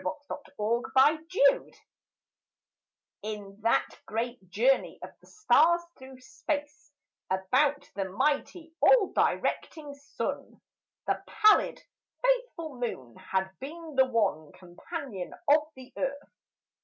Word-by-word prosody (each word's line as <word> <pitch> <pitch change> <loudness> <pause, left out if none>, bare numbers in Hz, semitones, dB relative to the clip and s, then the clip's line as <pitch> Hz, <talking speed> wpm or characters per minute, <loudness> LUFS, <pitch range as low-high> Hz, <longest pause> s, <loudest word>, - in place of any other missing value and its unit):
A - - -15 0.5
SOLAR 225 +3 +1
ECLIPSE 325 - +3 1.4
In 205 -2 -7
that 230 +2 +2 0.2
great 230 -3 -4
journey 240 +8 +2
of - - -8
the - - -22
stars 345 -5 +3
through 260 0 -13
space 290 0 -5 0.4
About 250 +10 +1
the 195 -1 -2
mighty, 295 - -1
all 465 -6 +5
directing 295 -3 -1
Sun, 280 0 -6 0.5
The - - -1
pallid, 425 -1 +4 0.4
faithful 480 - -1
Moon 130 - -5
has 190 0 -1
been 315 +3 -8
the 265 0 +6
one 205 - 0
Companion 195 - -7
of 300 +1 +4
the 260 -1 -13
Earth. 280 +1 -4
270 Hz, 105 wpm, -29 LUFS, 215-315 Hz, 1.4 s, the